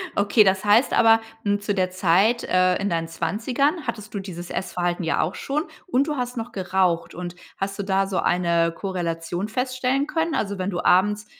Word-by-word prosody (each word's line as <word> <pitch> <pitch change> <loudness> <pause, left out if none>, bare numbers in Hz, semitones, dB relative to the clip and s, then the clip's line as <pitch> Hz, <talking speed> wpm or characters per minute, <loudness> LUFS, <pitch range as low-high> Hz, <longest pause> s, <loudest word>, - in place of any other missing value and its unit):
Okay, 205 +2 +4
das 190 0 +1
heißt 215 +6 +4
aber, 225 -1 +5 0.2
hm, 205 0 0
zu 205 0 -1
der 185 -2 0
Zeit, 190 +6 +2
äh, 185 0 +3
in 200 0 -2
deinen 165 -1 -1
20ern 255 - -1
hattest 215 -3 -5
du 205 - -3
dieses 175 -3 -7
Essverhalten 175 -1 -2
ja 165 - +1
auch 165 +4 -2
schon 295 +3 -2 0.2
und 280 -4 +1
du 300 - -1
hast 250 0 -3
noch 230 +1 -4
geraucht. 185 -3 0
Und, 175 0 -6 0.2
hast 195 +1 -4
du - - -1
da 195 0 +1
so 195 -1 -1
eine 170 -1 +1
Korrelation 175 0 -3
feststellen 255 +3 -1
können? 325 0 -1
Also, 200 -1 -2
wenn 185 +1 -2
du 175 - -2
abends 210 +3 +3
195 Hz, 195 wpm, -23 LUFS, 180-230 Hz, 0.2 s, aber